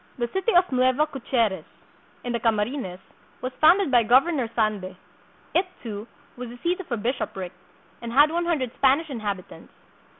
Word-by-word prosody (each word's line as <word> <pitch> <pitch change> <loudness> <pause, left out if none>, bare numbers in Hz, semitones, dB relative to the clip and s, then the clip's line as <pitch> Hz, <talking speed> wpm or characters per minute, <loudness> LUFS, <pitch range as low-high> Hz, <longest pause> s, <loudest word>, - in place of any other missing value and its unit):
The 240 -1 -1
City 385 +4 +1
of 355 - +7
Nueva 255 +3 +3
Caceres, 235 - -1 0.6
in 245 - -3
the 235 - 0
Camarines, 215 -3 -1 0.4
was 255 0 -5
founded 335 +1 +5
by 245 -2 +6
Governor 255 +2 +3
Sande. 210 -5 -1 0.6
It, 370 +1 +2 0.2
too, 215 -1 -6 0.3
was 245 -1 -7
the 240 - -10
seat 355 +2 0
of 375 - -9
a 235 - 0
bishopric, 205 -5 -3 0.5
and 235 -1 -5
had 290 +5 +5
one 345 +1 -1
hundred 275 -8 0
Spanish 280 +3 +2
inhabit 205 -7 -3
ants. 165 - -14
250 Hz, 165 wpm, -25 LUFS, 220-295 Hz, 0.6 s, of